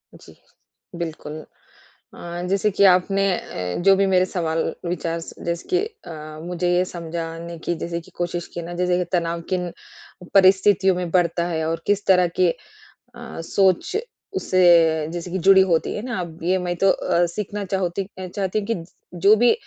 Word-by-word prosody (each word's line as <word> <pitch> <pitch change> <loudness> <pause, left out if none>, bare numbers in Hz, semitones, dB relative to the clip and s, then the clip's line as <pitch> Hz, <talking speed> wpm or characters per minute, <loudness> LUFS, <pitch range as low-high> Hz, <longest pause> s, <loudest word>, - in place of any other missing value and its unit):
जी, - - -16 0.6
बिल्कुल। 160 -2 -6 0.8
अ, 175 0 -6
जैसे 195 +2 +1
कि 200 0 +2
आपने 195 +1 +4
अ, 90 -1 -5
जो 195 +1 +6
भी 195 0 +3
मेरे 185 -1 +3
सवाल 165 -3 -1 0.2
विचार 170 -1 -2
स 165 - -10
जैस 170 0 -2
कि 365 - +4 0.3
अ, - - -7 0.3
मुझे 175 +1 -2
ये 180 - +3
समझाने 170 -1 -6
की 175 - 0
जैसे 170 0 -3
कि 165 - -17
कोशिश 175 0 -3
की 170 - -4
ना, 170 +1 -7
जैसे 180 0 +1
तनाव 170 -1 0
किन 180 -1 -1 0.6
परिस्थितियों 190 0 +5
में 180 -1 -3
बढ़ता 170 -1 +1
है 160 -2 -1
और 165 0 -2
किस 205 0 +1
तरह 180 -2 +5
की 180 - +5 0.4
अ, - - -11
सोच 190 - +1 0.4
उससे 170 - +4
जैसे 175 +1 -5
कि 190 - -2
जुड़ी 195 0 +8
होती 165 -1 +1
है 210 - -4
ना 245 -5 -3
अब 170 -2 -7
ये 185 +3 +2
मैं 175 0 -1
तो 195 +2 +3
अ, 175 -1 +1
सीखना 205 +3 -4
चाहूती 190 0 -2 0.2
चाहती 190 +2 -2
हूँ 205 - -3
कि 205 -7 -2 0.4
जो 200 +5 +7
भी 240 +2 +5
180 Hz, 175 wpm, -22 LUFS, 170-190 Hz, 0.8 s, जुड़ी